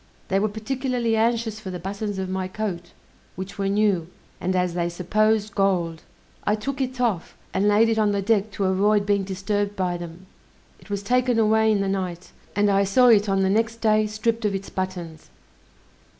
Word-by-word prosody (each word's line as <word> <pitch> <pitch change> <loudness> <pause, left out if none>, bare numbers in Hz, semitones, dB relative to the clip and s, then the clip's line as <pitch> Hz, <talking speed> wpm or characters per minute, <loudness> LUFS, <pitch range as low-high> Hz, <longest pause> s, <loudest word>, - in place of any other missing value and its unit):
They 195 - +2
were 215 +2 +1
particularly 240 +1 -1
anxious 225 -1 0
for 200 - -7
the 180 - -4
buttons 200 +3 -4
of 190 -1 -2
my 185 0 -2
coat, 185 -3 -4 0.4
which 190 +2 -7
were 195 - 0
new, 200 -4 +1 0.3
and 185 +1 -1
as 180 -1 +1
they 170 0 -1
supposed 215 +4 +1
gold. 175 -5 0 0.4
I 210 - +2
took 275 +6 -4
it 255 -1 -3
off, 220 -9 -1 0.2
and 195 +2 +2
laid 210 +2 +5
it 225 -1 +1
on 210 -1 +3
the 200 - 0
deck 215 0 +2
to 200 - -2
avoid 200 +2 +2
being 200 -1 +2
disturbed 200 +2 -2
by 180 -2 -1
them; 175 +1 -9 0.5
it - - -18
was 200 -1 -3
taken 250 +2 +2
away 220 0 +4
in 205 -2 +2
the 195 - 0
night, 185 -2 -3 0.2
and 205 0 +3
I 200 0 +3
saw 245 +6 +4
it 210 -2 +5
on 195 0 +2
the 190 - +2
next 225 +2 +1
day 215 -1 +2
stripped 225 +2 -1
of 205 -2 0
its 195 0 -6
buttons. 180 -4 -5
205 Hz, 195 wpm, -24 LUFS, 190-220 Hz, 0.5 s, laid